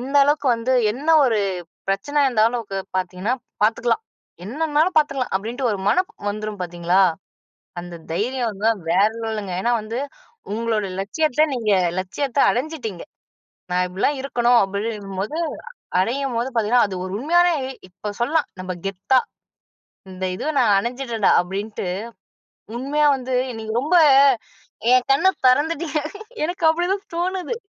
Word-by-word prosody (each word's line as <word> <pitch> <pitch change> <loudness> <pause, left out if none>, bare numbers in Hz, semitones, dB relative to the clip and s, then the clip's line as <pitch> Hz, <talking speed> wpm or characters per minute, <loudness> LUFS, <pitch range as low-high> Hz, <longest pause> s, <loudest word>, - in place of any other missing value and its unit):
இந்த 275 +3 -2
அளவுக்கு 290 0 +1
வந்து 230 +3 -1 0.2
என்ன 280 +7 -7 0.2
ஒரு 225 -4 +2 0.5
பிரச்சனையா 285 +9 +1
இருந்தாலும் 230 0 +1 0.3
பார்த்தீங்கன்னா 185 +4 -2 0.3
பார்த்துக்கலாம், 230 - +2 0.4
என்னன்னாலும் 310 - 0
பார்த்துக்கலாம். 275 -4 +1
அப்படின்ட்டு 235 +6 -3
ஒரு 200 - -2
மனம் 365 - +2 0.2
வந்துரும் 215 0 -4
பார்த்தீங்களா, 175 +1 +1 0.8
அந்த 175 0 -9 0.2
தைரியம் 240 +6 -1
வந்து 205 +3 0 0.2
வேற 195 +5 +4
லெவல்லுங்க. 215 -4 -4
ஏனா, 240 - +2
வந்து 220 +3 -5 0.6
உங்களோட 225 -2 -1
லட்சியத்த, 305 +8 +1
நீங்க 225 -4 -1 0.3
லட்சியத்த 270 +9 -2
அடைஞ்சிட்டீங்க. 245 - -4 0.7
நான் 180 0 +2
இப்படிலாம் 205 +10 0
இருக்கணும் 245 -3 +3
அப்படிங்கும்போது, 200 - -4 0.6
அடையும்போது 245 +3 -1
பார்த்தீங்கன்னா, 230 +1 +3
அது 190 - -5
ஒரு 185 - -6
உண்மையான, 345 +5 +4 0.4
இப்ப 195 +3 -6
சொல்லலாம் 300 +7 +1
நம்ம 185 0 -4
கெத்தா, 195 +7 +2 0.9
இந்த 185 0 -4
இது 185 - -6
நான் 210 -5 +4
அடைஞ்சுட்டேன்டா 235 -1 0
அப்படின்ட்டு, 195 +2 -5 0.9
உண்மையா 295 +4 +1
வந்து 260 0 -5 0.2
இன்னைக்கு 220 -2 -5
ரொம்ப 320 +6 +1 1.0
என் 255 0 +3
கண்ண 275 +8 +4 0.2
தொறந்துட்டீங்க. 305 +3 +2 0.5
எனக்கு 350 0 -5
அப்படிதான் 360 +5 0
தோணுது. 370 +5 -2
235 Hz, 120 wpm, -22 LUFS, 205-285 Hz, 1.0 s, வேற